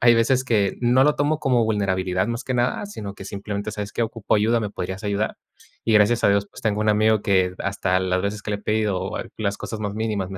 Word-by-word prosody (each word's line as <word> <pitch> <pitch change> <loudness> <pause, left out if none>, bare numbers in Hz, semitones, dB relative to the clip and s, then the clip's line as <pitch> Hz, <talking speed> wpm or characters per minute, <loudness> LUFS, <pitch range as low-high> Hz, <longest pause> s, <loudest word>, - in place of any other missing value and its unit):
hay 120 0 +6
veces 120 +3 +3
que 105 -6 +1
no 125 +2 +4
lo 150 +1 +4
tomo 145 +2 +1
como 125 -5 +2
vulnerabilidad 95 -3 0
más 115 0 -3
que 130 - -2
nada, 125 +11 0
sino 105 - -7
que 100 - -10
simplemente: 100 +1 -4
"¿Sabes 105 -1 -5
qué? - - -1
Ocupo 115 -2 -1
ayuda, 110 +3 +2
¿me 105 -2 -3
podrías 95 +1 -5
ayudar?". 105 +1 -1 0.5
Y 115 - +1
gracias 105 +3 +4
a - - +6
Dios, 100 0 +2
pues - - -12
tengo 105 -1 0
un 110 - 0
amigo 110 0 +3
que 95 -2 +2
hasta 95 -2 0
las 95 0 0
veces 100 +1 -3
que 105 - -5
le - - 0
he - - -17
pedido 105 -3 0
o - - -4
a - - -4
las 100 -2 -1
cosas 110 - -6
más 105 -1 -3
mínimas 105 -3 -2
me 95 - -6
105 Hz, 255 wpm, -23 LUFS, 100-115 Hz, 0.5 s, hay